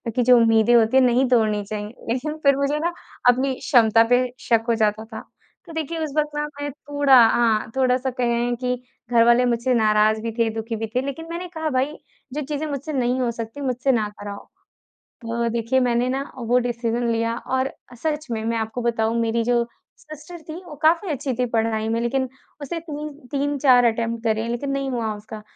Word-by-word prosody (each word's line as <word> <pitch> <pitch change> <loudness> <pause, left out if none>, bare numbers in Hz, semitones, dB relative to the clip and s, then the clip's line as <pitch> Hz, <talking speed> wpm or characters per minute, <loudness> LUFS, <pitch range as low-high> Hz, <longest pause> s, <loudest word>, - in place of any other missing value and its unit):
की 250 - +2
जो 250 +1 +6
उम्मीदें 225 0 +4
होती 230 +3 +4
है - - +7
नहीं 250 +1 +3
तोड़नी 215 -4 +2
चाहिए 210 +2 -7
लेकिन 300 +6 -2
फिर 280 -1 +5
मुझे 280 +2 0
ना 340 +2 -1 0.4
अपनी 260 +2 +2
क्षमता 225 -4 +4
पे 245 - +5 0.2
शक 230 -1 +1
हो 230 - +3
जाता 215 0 +1
था। 220 0 -8 0.5
तो 330 - -11
देखिए 320 +1 -3
उस 295 -3 -4
वक़्त 300 0 +1
ना 295 0 -1 0.2
मैं 290 - -2
थोड़ा 285 -1 +2
हाँ, 225 -2 +1
थोड़ा 255 -1 +3
सा 260 +1 -3
कहें 240 -1 0
कि 250 0 +1 0.4
घरवाले 235 +1 +5
मुझसे 245 +1 +1
नाराज़ 215 -1 +3
भी 230 0 -3
थे, 230 -1 +3
दुखी 225 +1 -4
भी 220 0 -3
थे 255 - +3
लेकिन 325 +4 -5
मैंने 350 +2 -5
कहा, 315 -1 -1
"भाई 270 +3 0 0.4
जो 300 - -2
चीज़ें 295 +2 -3
मुझसे 290 +2 -4
नहीं 250 -1 0
हो 240 - +1
सकती, 230 +4 -7
मुझसे 260 0 0
ना 220 -4 +1
कराओ।" 205 0 -7 0.8
तो 235 +1 -1
देखिए 235 +3 0
मैंने 245 0 +1
ना 270 +1 -1
वो 245 +1 +2
डिसीज़न 235 0 -1
लिया 230 0 0
और 260 +1 0 0.3
सच 305 -2 -2
में 220 -1 -2
मैं 230 0 0
आपको 220 +2 -3
बताऊँ 230 -1 0
मेरी 230 0 0
जो 240 0 +2 0.3
सिस्टर 310 +2 -11
थी 310 - -5
वो 305 -4 -9
काफ़ी 340 +4 +3
अच्छी 270 -2 -2
थी 250 +1 0
पढ़ाई 220 -1 0
में 230 +1 0
लेकिन 260 +2 -1 0.3
उसने 330 +4 -4
तीन 305 -2 -6
तीन 280 -4 -16
4 275 -3 +4
अटेम्प्ट 230 0 -3
करे 220 0 0
लेकिन 240 +4 -3
नहीं 275 -1 -2
हुआ 225 -3 -2
उसका। 215 +1 -9
245 Hz, 200 wpm, -22 LUFS, 230-275 Hz, 0.8 s, है